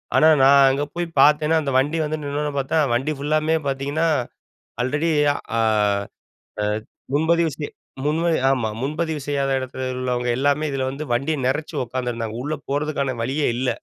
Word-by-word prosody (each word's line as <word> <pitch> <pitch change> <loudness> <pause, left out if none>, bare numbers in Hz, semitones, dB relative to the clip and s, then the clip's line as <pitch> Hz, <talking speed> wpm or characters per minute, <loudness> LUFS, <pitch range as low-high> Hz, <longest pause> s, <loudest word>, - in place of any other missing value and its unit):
ஆனா, 155 - +6 0.2
நான் 140 +1 +7
அங்க 140 +2 0
போய் 175 -1 -2
பார்த்தேனா, 150 +2 +4
அந்த 140 -2 -2
வண்டி 150 +5 0
வந்து 155 +1 -3
நின்னோன 145 +1 -2
பார்த்தா 140 +4 0
வண்டி 135 +6 0
ஃபுல்லாமே 155 +2 +1
பார்த்தீங்கன்னா, 140 +4 0 0.8
அல்ரெடி 150 +6 0 0.5
ஆ - - +3 1.0
அ - - +1 0.5
முன்பதிவு 165 +2 +2
செய் 145 - -5 0.3
முன்பதி 165 +2 +1
ஆமா, 125 -5 +1
முன்பதிவு 155 +2 -2
செய்யாத 140 -1 0
எடத்துல 130 0 -5
உள்ளவங்க 125 -1 -1
எல்லாமே 145 +2 +2
இதில 135 -1 -1
வந்து 145 +3 -5
வண்டிய 140 +6 0
நெறச்சு 150 +4 -1
உட்கார்ந்திருந்தாங்க. 115 -3 -3
உள்ள 150 +2 -2
போறதுக்கான 140 -3 -1
வழியே 140 +4 0
இல்ல. 130 0 0
145 Hz, 150 wpm, -22 LUFS, 135-155 Hz, 1.0 s, நான்